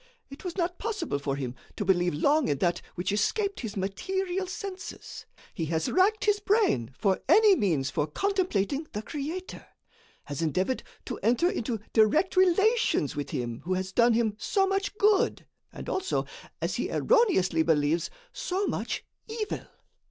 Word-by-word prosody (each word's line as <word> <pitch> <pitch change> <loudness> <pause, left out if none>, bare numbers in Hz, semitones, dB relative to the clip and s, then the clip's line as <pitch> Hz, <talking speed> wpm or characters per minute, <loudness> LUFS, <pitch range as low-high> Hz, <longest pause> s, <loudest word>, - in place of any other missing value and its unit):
It 275 - -10
was 360 -1 -5
not 355 0 -1
possible 410 - -2
for 140 -1 -2
him 130 -3 -4 0.2
to 205 - -3
believe 175 -3 +2
long 285 - +3
in 145 - +1
that 175 +4 0
which 175 - -1
escaped 395 - 0
his 220 -4 -5
material 375 - -2
senses. 375 0 -7 0.3
He 165 - -2
has 160 0 -1
racked 405 +4 +3
his 415 -1 +3
brain 400 - +2
for 195 -3 +1
any 430 -2 +7
means 160 - 0
for 150 - 0
contemplating 310 - 0
the 210 - -4
Creator; 315 +8 -5 0.6
has 145 0 -5
endeavored 185 - 0 0.2
to 245 - -5
enter 245 - +2
into 225 -1 -2
direct 265 - +3
relations 385 - +3
with 145 -1 -4
him 120 -1 -3
who 185 +2 -1
has 185 0 -3
done 235 +2 +4
him 225 -2 +2
so 390 -2 +2
much 390 +2 -1
good, 415 -1 +3 0.3
and - - -9
also, 380 0 -1 0.4
as - - -1
he - - -2
erroneously 290 - +3
believes, 160 0 +2 0.2
so 380 +3 -2
much - - -3 0.2
evil. 440 -1 -4
260 Hz, 160 wpm, -28 LUFS, -, 0.6 s, any